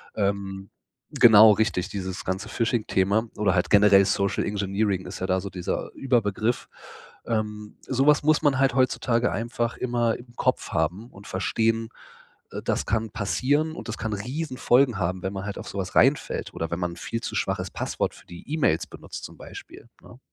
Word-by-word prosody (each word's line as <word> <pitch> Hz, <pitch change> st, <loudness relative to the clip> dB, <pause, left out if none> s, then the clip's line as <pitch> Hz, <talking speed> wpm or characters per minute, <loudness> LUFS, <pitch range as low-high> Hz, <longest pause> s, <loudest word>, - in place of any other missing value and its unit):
Ähm, 100 Hz, -1 st, -2 dB, 0.4 s
genau 110 Hz, -1 st, +8 dB
richtig, 100 Hz, -3 st, 0 dB
dieses 95 Hz, -1 st, -5 dB
ganze 95 Hz, +1 st, -3 dB
Phishing-Thema 110 Hz, -2 st, 0 dB
oder 100 Hz, -3 st, +2 dB
halt 90 Hz, -, +1 dB
generell 100 Hz, -1 st, +6 dB
Social 100 Hz, 0 st, 0 dB
Engineering 100 Hz, -1 st, -1 dB
ist -, -, -7 dB
ja 95 Hz, -, -2 dB
da 95 Hz, 0 st, +1 dB
so 100 Hz, -, -6 dB
dieser 90 Hz, -2 st, -4 dB
Überbegriff. 120 Hz, -3 st, 0 dB, 0.6 s
Ähm, 105 Hz, -2 st, -3 dB
sowas 140 Hz, +3 st, +3 dB
muss 155 Hz, 0 st, +3 dB
man 145 Hz, -4 st, +2 dB
halt 135 Hz, -2 st, +3 dB
heutzutage 125 Hz, -2 st, +2 dB
einfach 115 Hz, +2 st, -2 dB
immer 120 Hz, -2 st, 0 dB
im 120 Hz, 0 st, -16 dB
Kopf 130 Hz, -, 0 dB
haben 90 Hz, +9 st, -1 dB
und 95 Hz, 0 st, -14 dB
verstehen, 115 Hz, +4 st, 0 dB, 0.6 s
äh, -, -, -5 dB
das -, -, -1 dB
kann 110 Hz, -1 st, -1 dB
passieren 145 Hz, +9 st, 0 dB
und 120 Hz, -, -8 dB
das 110 Hz, -, -4 dB
kann 110 Hz, -2 st, -3 dB
Riesenfolgen 130 Hz, 0 st, +1 dB
haben, 90 Hz, +1 st, -2 dB
wenn 95 Hz, +1 st, -3 dB
man 95 Hz, 0 st, -5 dB
halt 105 Hz, -, -5 dB
auf -, -, -8 dB
sowas -, -, -5 dB
reinfällt, -, -, +2 dB
oder 80 Hz, 0 st, -4 dB
wenn 85 Hz, -, -2 dB
man 90 Hz, -1 st, -1 dB
'n -, -, -10 dB
viel 115 Hz, +5 st, -4 dB
zu -, -, -5 dB
schwaches -, -, -1 dB
Passwort -, -, -2 dB
für -, -, -18 dB
die 85 Hz, +9 st, -12 dB
E-Mails 105 Hz, -, +1 dB
benutzt, -, -, -9 dB
zum -, -, -11 dB
Beispiel, 115 Hz, -, -12 dB
ne? 125 Hz, -, -15 dB
105 Hz, 175 wpm, -25 LUFS, 95-120 Hz, 0.6 s, genau